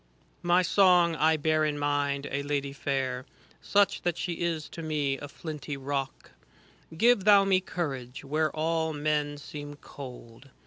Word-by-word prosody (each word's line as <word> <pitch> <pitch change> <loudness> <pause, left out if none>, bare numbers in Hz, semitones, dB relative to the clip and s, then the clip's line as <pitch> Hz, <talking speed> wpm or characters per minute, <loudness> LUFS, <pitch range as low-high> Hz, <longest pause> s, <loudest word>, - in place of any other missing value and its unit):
"" - - -37
My 180 +1 +5
Song, 180 -3 +4
I 160 +1 +3
bear 155 +1 +1
in 150 -1 0
mind 145 -1 0
a 140 - -1
Lady 140 -1 -2
fair, 130 -2 -2 0.3
Such 205 -1 +2
that 175 -1 -1
she 175 - -2
is 165 -3 -1
to 165 - -8
me 150 -4 -1
as 145 -1 -8
flinty 150 -3 -6
rock; 135 0 -4 0.7
Give 235 0 +4
thou 200 -1 +6
me 190 -1 +4
courage, 135 -9 -5
where 155 +3 +1
all 160 +1 -1
men 150 0 -1
seem 145 0 -8
cold. 130 -3 -11
150 Hz, 155 wpm, -28 LUFS, 140-165 Hz, 0.7 s, thou